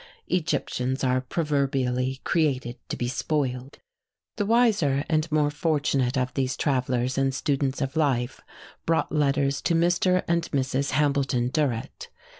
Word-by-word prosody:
Egyptians 140 -6 -1
are 130 0 +2
proverbially 130 -3 -1
created 135 -7 0
to - - -3
be 120 - -2
spoiled. 130 0 -2 0.6
The 205 -3 -1
wiser 200 - +3
and 155 0 0
more 150 -1 +2
fortunate 145 -5 0
of 125 0 -1
these 130 -1 -1
travellers 130 -2 0
and 135 -1 +1
students 140 0 -1
of 135 0 -4
life 130 -5 0 0.5
brought 165 0 +1
letters 140 -2 +1
to 170 - +1
Mr. 175 +2 +2
and 170 0 0
Mrs. 135 0 0
Hambleton 140 -4 +1
Durrett. 130 -5 -2
140 Hz, 130 wpm, -25 LUFS, 130-155 Hz, 0.6 s, wiser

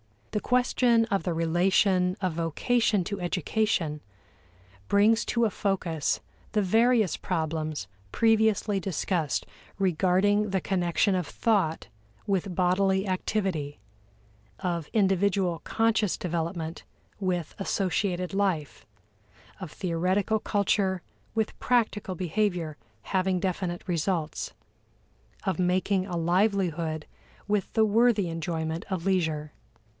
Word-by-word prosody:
The 210 - 0
question 245 -1 +3
of 195 - +1
the 175 - -1
relation 180 +2 +2
of 185 -3 0
vocation 190 +6 +1
to 200 +3 -4
education 175 -3 0 0.9
brings 215 +3 +4
to 235 - +1
a 225 - +4
focus 185 -6 -1 0.3
the 210 - +3
various 225 +1 +3
problems 155 - -2 0.2
previously 220 -2 +2
discussed 175 -4 -1 0.3
regarding 195 +3 +2
the 190 -1 +1
connection 180 +2 +1
of 180 -4 -1
thought 185 - 0 0.4
with 195 -3 -1
bodily 190 +2 +2
activity; 185 -6 -2 0.8
of 170 -4 -2
individual 195 -3 +2
conscious 225 -3 +1
development 165 -1 -3 0.4
with 180 -4 -2
associated 185 -1 -1
life; 165 - -1 0.7
of 185 -4 -6
theoretical 185 +5 0
culture 195 -3 0 0.3
with 220 -1 -1
practical 220 -6 +1
behavior 180 -3 -1 0.3
having 185 -1 0
definite 180 -2 -2
results; 170 -2 -2 0.9
of 190 -4 -1
making 185 +1 +1
a 175 -3 -3
livelihood 170 -3 +1 0.4
with 205 -1 0
the 220 -1 +4
worthy 215 -3 +3
enjoyment 165 0 -3
of 185 -3 -3
leisure. 160 -6 0
185 Hz, 105 wpm, -27 LUFS, 170-205 Hz, 0.9 s, brings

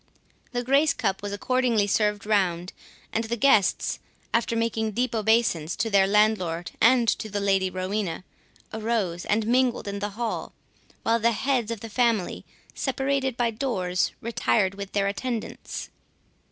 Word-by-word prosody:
The 245 0 -2
grace 280 +4 +3
cup 190 -1 -1
was 205 0 -4
accordingly 235 0 +1
served 210 0 +1
round, 185 -4 0 0.4
and 225 +1 0
the 235 +1 -2
guests, 220 -6 +3 0.3
after 230 0 +1
making 225 -1 -1
deep 245 +2 0
obeisance 220 -7 +1
to 225 - -2
their 195 -1 +5
landlord 195 -5 +1
and 240 0 +5
to 215 - 0
the 205 0 -2
Lady 195 -2 +2
Rowena, 185 -1 -3 0.5
arose 215 -6 -1
and 210 +1 +1
mingled 245 -1 +1
in 200 0 -3
the 205 +1 -2
hall, 235 -2 -3 0.5
while 230 +1 +2
the 230 +1 +3
heads 245 -1 0
of 230 -3 -4
the 225 - -6
family, 225 -3 0 0.2
by - - -20
separate 265 -4 -1
doors, 185 -9 0
retired 215 -4 +1
with 200 0 -8
their 200 -1 +1
attendants. 225 +3 -4
220 Hz, 150 wpm, -25 LUFS, 200-235 Hz, 0.5 s, their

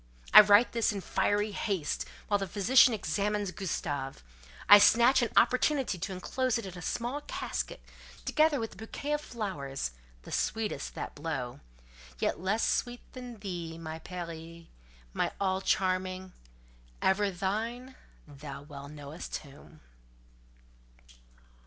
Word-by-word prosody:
I - - +13
write 210 +3 +5
this 230 -1 +1
in 205 - -4
fiery 205 +2 0
haste; 190 -6 -2 0.2
while 205 -1 +2
the 195 - -3
physician 235 +7 +5
examines 205 0 -1
Gustave, 145 -8 -3 0.5
I 205 - +11
snatch 235 +5 +6
an 235 - +1
opportunity 255 - +3
to 190 +3 -4
enclose 245 +7 -1
it 230 - -5
in 185 -1 -8
a 175 - -8
small 245 - -2
casket, - - -4 0.4
together 310 -2 +3
with 225 -1 -4
a - - -17
bouquet 280 +6 -4
of 295 - 0
flowers, 150 - -4 0.3
the - - -11
sweetest 220 -10 -2
that - - -5
blow—yet - - -5
less 195 +5 +1
sweet 245 0 -1
than 250 -2 -8
thee, 170 -4 -5
my 160 -1 -6
Peri—my 165 - -7
all 190 -1 0
charming! 185 -1 0 0.7
ever 200 +2 +2
thine 225 +8 -3 0.3
thou 140 -1 -9
well 140 -1 -10
knowest 150 +2 -6
whom!" 150 +2 -15
190 Hz, 125 wpm, -30 LUFS, 155-225 Hz, 0.7 s, I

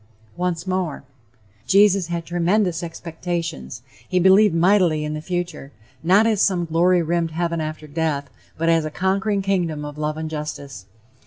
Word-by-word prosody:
Once 175 -1 -2
more: 185 -7 -2 0.6
"Jesus 195 -2 +4
had 170 -1 -3
tremendous 175 +1 +1
expectations....He 165 -4 -5
believed 190 +1 +5
mightily 170 -3 +3
in 150 - -3
the 155 - -4
future, 175 -4 -4 0.3
not 190 +7 +4
as 220 -3 +2
some 180 -3 +2
glory 170 +2 +3
rimmed 170 0 0
heaven 170 0 -2
after 155 0 -5
death, 150 -2 -2 0.3
but 165 +2 -1
as 165 -1 +3
a 155 - -3
conquering 195 +4 0
kingdom 170 -6 -1
of 145 0 -8
love 155 0 -2
and 160 0 -4
justice. 150 -9 -6
170 Hz, 150 wpm, -22 LUFS, 155-185 Hz, 0.6 s, believed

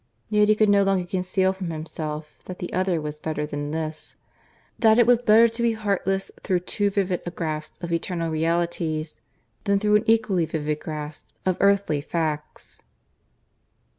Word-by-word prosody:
Yet 210 -1 +3
he 215 - +6
could 215 0 +3
no 200 0 +5
longer 195 -2 +2
conceal 185 +1 0
from 190 -2 -5
himself 155 -1 -6
that 185 - -7
the 175 - -6
other 185 -2 +1
was 150 0 -5
better 155 -1 -2
than 145 0 -4
this 155 0 -4 0.6
that 220 -1 +5
it 240 - +6
was 245 0 +4
better 230 0 +6
to 230 +1 -5
be 235 -1 +3
heartless 195 -3 -1
through 180 -2 0
too 205 +2 0
vivid 190 -2 0
a - - -4
grasp 155 -2 -5
of 170 -1 -2
eternal 170 -1 -1
realities, 160 -4 -1 0.5
than 200 0 +3
through 210 0 +4
an 210 - -2
equally 215 -7 +3
vivid 155 -1 -2
grasp 150 -1 -6 0.2
of 185 -1 +2
earthly 200 -7 +3
facts. 155 -1 -4
180 Hz, 165 wpm, -24 LUFS, 155-200 Hz, 0.6 s, he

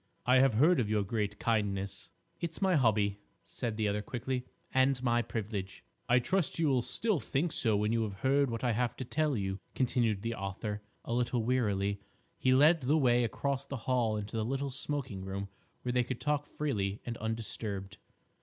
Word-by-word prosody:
"I 125 +1 +5
have 130 -3 +4
heard 160 +8 +5
of 110 -4 0
your 105 -1 +2
great 105 0 -2
kindness." 100 -4 -1 0.3
"It's 165 -1 -4
my 190 -2 +3
hobby," 105 -6 +2 0.2
said 115 -3 -4
the 110 -2 +1
other 105 +1 0
quickly, 125 +3 -3 0.3
"and 130 0 +4
my 120 -1 +3
privilege." 100 -4 -4 0.3
"I 120 - +6
trust 175 +7 +1
you 165 -3 +2
will 130 -2 +3
still 210 - 0
think 150 +5 -1
so 110 -7 +1
when 105 +1 +1
you 115 0 +2
have 100 -3 -4
heard 140 +1 +3
what 115 0 -4
I 120 - +2
have 120 +1 0
to 130 - -4
tell 150 0 +1
you," 95 -1 -2 0.2
continued 115 -5 +1
the 115 0 -1
author, 105 +1 -4 0.2
a - - -2
little 120 -1 +1
wearily. 100 -5 +1 0.4
He 130 - +3
led 150 +5 +6
the 140 +5 +3
way 125 -4 +4
across 135 +4 -1
the 140 - -4
hall 120 -4 +2
into 105 +1 -5
the 110 - 0
little 135 +4 -2
smoking 130 -7 -3
room 100 +1 -4 0.3
where 125 - -1
they 125 0 +3
could 125 0 -4
talk 150 -1 0
freely 105 -9 -2
and 120 - -3
undisturbed. 105 -3 -4
120 Hz, 190 wpm, -32 LUFS, 105-135 Hz, 0.4 s, I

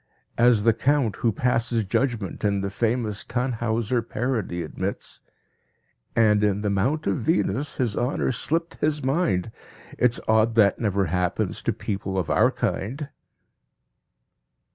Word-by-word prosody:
As 120 -3 +5
the 115 0 +5
count 130 -4 +1
who 115 - +1
passes 115 0 0
judgment 110 -1 -2
in 100 -1 +1
the 100 0 -3
famous 110 -1 -1
Tannhauser 120 -1 -1
parody 110 -8 -2
admits: 80 - -5 0.9
"And 105 -2 +4
in 105 -1 +1
the 105 -1 0
mount 135 +11 0
of - - +1
Venus, 150 0 0
his 120 -6 -1
honor 125 +2 0
slipped 165 +7 -1
his 150 -1 0
mind, 130 - 0 0.5
It's 120 -1 +3
odd 110 +1 +3
that 105 -3 +4
never 100 -3 +1
happens 90 +1 -1
to - - 0
people 95 -1 -4
of 90 -4 -1
our - - +4
kind." 135 +9 -3
115 Hz, 135 wpm, -24 LUFS, 100-125 Hz, 0.9 s, As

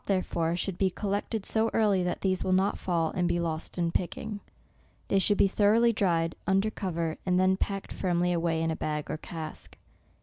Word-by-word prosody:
therefore, 175 -4 0
should 180 0 -3
be 195 - +3
collected 205 +2 -3
so 225 0 +1
early 205 -4 +3
that 180 0 -2
these 185 -1 +1
will 185 - -1
not 190 +2 +2
fall, 170 -3 0
and 180 -1 0
be 175 - +1
lost 165 0 -3
in 170 -1 0
picking. 205 +4 -3 0.7
They 195 - +3
should 205 +1 +3
be - - +5
thoroughly 220 +4 +4
dried, 165 -6 +1
under 195 +3 +2
cov 185 -6 -4
er, 165 -2 -1
and 180 -1 +2
then 185 0 +4
packed 195 0 -3
firmly 180 -1 0
away 165 -1 0
in 165 - 0
a - - -1
bag 150 -1 -3
or 155 - -4
<;ask. 160 -2 -7
185 Hz, 200 wpm, -28 LUFS, 170-200 Hz, 0.7 s, be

